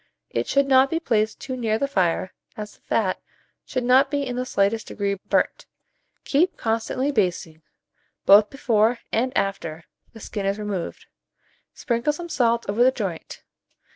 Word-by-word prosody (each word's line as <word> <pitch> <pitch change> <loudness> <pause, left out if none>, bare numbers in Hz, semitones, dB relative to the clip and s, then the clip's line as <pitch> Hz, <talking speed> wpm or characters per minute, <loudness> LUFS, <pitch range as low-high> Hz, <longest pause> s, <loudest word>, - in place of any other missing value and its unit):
It 115 +1 -1
should 280 0 +3
not 265 0 +5
be 330 - 0
placed 220 -8 0
too 260 - -5
near 225 -3 0
the 280 - -1
fire, 185 -7 0 0.2
as 210 -1 -6
the - - -25
fat 195 -5 -1 0.5
should 255 -2 -2
not 260 +3 +5
be 285 -1 -1
in 250 -2 -4
the 250 0 -3
slightest 205 0 0
degree 200 -1 -2 0.2
burnt. - - 0 0.6
Keep 330 +6 +1
constantly 230 +5 -1
basting, 175 - -1 0.6
both 205 +1 +7
before 235 -3 +2
and 250 +3 +1
after 170 -5 -2 0.3
the 225 - -11
skin 200 -2 -4
is 200 +1 0
removed; 205 -5 -5 0.7
sprinkle 235 +5 0
some 345 +3 -7
salt 235 -5 +1
over 210 +4 +2
the 255 - +6
joint. 200 -10 -5
225 Hz, 160 wpm, -23 LUFS, 200-260 Hz, 0.7 s, both